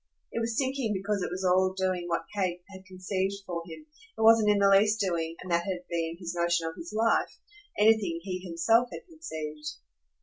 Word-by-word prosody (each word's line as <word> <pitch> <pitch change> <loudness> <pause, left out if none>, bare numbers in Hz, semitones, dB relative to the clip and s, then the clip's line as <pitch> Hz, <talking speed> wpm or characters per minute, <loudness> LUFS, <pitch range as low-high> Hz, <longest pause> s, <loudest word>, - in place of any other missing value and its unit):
It - - -2
was 230 0 -2
sinking 260 -5 0
because 200 +1 -1
it - - -2
was 185 +2 -4
all 185 +1 +3
doing 185 -2 -1
what 165 -1 -1
Kate 180 -3 -1
had 190 -1 -12
conceived 190 +1 -2
for 170 -2 -3
him; 175 - -10 0.3
it - - -4
wasn't 220 -1 +6
in 205 - +4
the 200 0 +4
least 210 +2 +4
doing 165 -4 -1
and 185 - -7
that 170 0 +2
had 180 -2 -4
been 165 -1 -2
his 170 -2 -5
notion 170 -1 +1
of 160 - -4
his 335 - -8
life 225 +1 +1 0.4
anything 210 -6 +3
he 185 -1 -4
himself 185 +7 +2
had - - -8
conceived. 155 - -7
185 Hz, 200 wpm, -28 LUFS, 170-210 Hz, 0.4 s, wasn't